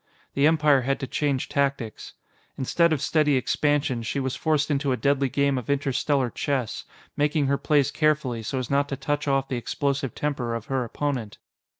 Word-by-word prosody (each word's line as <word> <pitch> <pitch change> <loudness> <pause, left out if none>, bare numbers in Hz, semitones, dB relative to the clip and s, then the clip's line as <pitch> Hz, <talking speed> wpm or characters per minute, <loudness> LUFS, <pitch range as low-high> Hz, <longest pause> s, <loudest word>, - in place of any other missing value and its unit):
The 140 +2 +4
Empire 150 -4 +4
had 135 +2 -1
to - - -1
change 140 -1 -1
tactics. 140 -5 -2 0.4
Instead 170 +5 +2
of 150 -2 0
steady 150 -2 +2
expansion, 145 -1 0
she 115 +5 -2
was 130 -1 -2
forced 155 -2 0
into 140 -1 0
a 125 - +1
deadly 140 -1 +1
game 140 0 +1
of 120 - -10
interstellar 140 -2 +1
chess, 130 -6 -2 0.3
making 150 0 +1
her 140 +1 +1
plays 145 -4 +2
carefully, 150 -6 +1
so 110 +5 -3
as 130 -1 -3
not 140 +1 +2
to 135 - -2
touch 145 +1 -2
off 135 -1 +1
the 130 - -2
explosive 135 +2 -2
temper 130 -6 -2
of 115 -2 -5
her 135 -1 -1
opponent. 120 -3 -3
140 Hz, 185 wpm, -25 LUFS, 130-145 Hz, 0.4 s, The